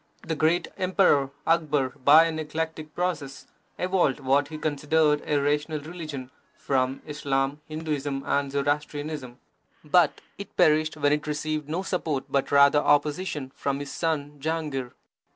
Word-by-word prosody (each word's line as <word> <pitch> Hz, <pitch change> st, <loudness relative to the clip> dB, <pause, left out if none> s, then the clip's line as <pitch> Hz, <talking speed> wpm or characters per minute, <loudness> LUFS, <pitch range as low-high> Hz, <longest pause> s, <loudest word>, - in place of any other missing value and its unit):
The 160 Hz, -, -2 dB
great 160 Hz, +3 st, +2 dB
Emperor 185 Hz, -7 st, +3 dB, 0.2 s
Akbar, 150 Hz, -5 st, +2 dB
by 145 Hz, +5 st, +6 dB
an 160 Hz, -1 st, -2 dB
eclectic 155 Hz, 0 st, -4 dB
process, 160 Hz, -7 st, -3 dB, 0.3 s
evolved 180 Hz, -6 st, +1 dB
what 140 Hz, +1 st, +2 dB
he 155 Hz, +1 st, -7 dB
considered 150 Hz, 0 st, +1 dB
a 150 Hz, -, +2 dB
rational 150 Hz, +2 st, 0 dB
religion 150 Hz, -5 st, -7 dB, 0.3 s
from 130 Hz, -1 st, -1 dB
Islam, 140 Hz, -1 st, -1 dB
Hindusim, 145 Hz, -3 st, -3 dB
and 140 Hz, -1 st, 0 dB
Zoroastrianism, 145 Hz, -2 st, -2 dB, 0.5 s
but -, -, +3 dB, 0.2 s
it -, -, -9 dB
perished 155 Hz, 0 st, +3 dB
when 145 Hz, -1 st, +3 dB
it 150 Hz, 0 st, -2 dB
received 150 Hz, 0 st, -3 dB
no 175 Hz, +5 st, -2 dB
support 160 Hz, -8 st, -2 dB
but 140 Hz, -1 st, 0 dB
rather 140 Hz, +1 st, +6 dB
opposition 145 Hz, -1 st, 0 dB
from 140 Hz, 0 st, -2 dB
his 145 Hz, -1 st, -6 dB
son 150 Hz, -3 st, -2 dB
Jahangir. 150 Hz, -4 st, -3 dB
150 Hz, 135 wpm, -26 LUFS, 140-155 Hz, 0.5 s, by